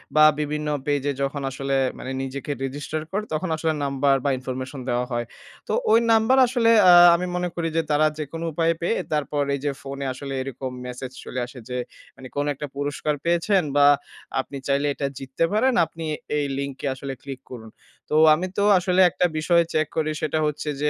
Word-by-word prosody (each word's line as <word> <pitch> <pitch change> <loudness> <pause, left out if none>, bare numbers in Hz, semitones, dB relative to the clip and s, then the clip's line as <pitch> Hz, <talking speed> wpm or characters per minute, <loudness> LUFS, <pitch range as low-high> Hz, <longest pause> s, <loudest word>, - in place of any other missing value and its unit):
বা 155 - +7 0.2
বিভিন্ন 150 0 -2 0.2
পেজে 145 -1 0
যখন 140 +1 -2
আসলে 135 +1 -2 0.2
মানে 130 - -6
নিজেকে 135 +2 -5
register 145 +3 -4
করে 205 +2 -1
তখন 165 +3 -2
আসলে 160 0 0
নাম্বার 140 0 +2
বা - - +3
information 130 +1 -5
দেওয়া 125 0 0
হয়। 120 0 -1 0.4
তো - - -1 0.2
ওই 225 - +7
নাম্বার 225 +4 +4
আসলে 240 -2 +2 0.2
আ - - +10 0.2
আমি 180 - -2
মনে 180 0 -1
করি 170 -1 -1
যে - - +4
তারা 150 +1 +4
যেকোনো 165 +3 -5
উপায়ে 165 +1 +2
পেয়ে 175 - 0 0.2
তারপর 145 -1 0
এইযে 140 +1 -2
ফোনে 140 0 -6
আসলে 135 +1 -7
এরকম 130 0 -5
মেসেজ 125 +1 -6
চলে 130 - -4
আসে 125 +1 -11
যে 125 - -3 0.4
মানে 130 0 -10
কোনো 145 +1 0
একটা 145 +2 -6
পুরস্কার 145 +1 -2
পেয়েছেন 175 +3 +2
বা 145 0 +6 0.6
আপনি 140 - -8
চাইলে 140 +1 +2
এটা - - -16 0.2
জিততে 135 +4 -1
পারেন। 255 +5 +3
আপনি 165 0 -8 0.3
এই 145 - 0
লিঙ্কে 140 0 -5
আসলে 135 +1 -6
ক্লিক 135 -2 -8
করুন। 110 -3 -9 0.4
তো 150 - 0 0.2
আমি 175 +4 -1
তো 200 - +2 0.2
আসলে 180 +1 +2
একটা 180 - 0
বিষয় 170 +2 +3
চেক 155 -2 +1
করি 155 -1 0
সেটা 155 0 0
হচ্ছে 150 0 -2
যে 150 - +2
145 Hz, 190 wpm, -24 LUFS, 135-165 Hz, 0.6 s, আ